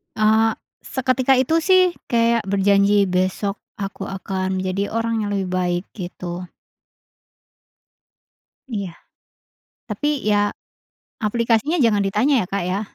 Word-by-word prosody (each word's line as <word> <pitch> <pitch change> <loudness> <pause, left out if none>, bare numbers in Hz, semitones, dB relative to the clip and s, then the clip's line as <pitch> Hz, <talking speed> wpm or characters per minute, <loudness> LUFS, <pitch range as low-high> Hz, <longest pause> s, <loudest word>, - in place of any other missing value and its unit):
Eee, 220 +1 +3 0.3
seketika 260 0 +1
itu 265 +6 +2
sih 370 +2 +4 0.2
kayak 230 -2 +2
berjanji 200 0 +3
besok 185 +2 -1 0.2
aku 195 -1 -6
akan 190 -1 -3
jadi 195 +3 -2
orang 230 -1 -1
yang 205 - -2
lebih 190 -2 -2
baik 180 -1 0
gitu. 180 -1 -6 2.3
Iya, 195 -5 -4 1.0
tapi 295 -2 -1
ya, 205 -1 +1 0.7
aplikasinya 230 +8 +1
jangan 220 -6 +3
ditanya 210 +9 +2
ya - - -5
Kak 200 -2 -1
ya. 190 +3 -1
205 Hz, 110 wpm, -21 LUFS, 190-230 Hz, 2.3 s, sih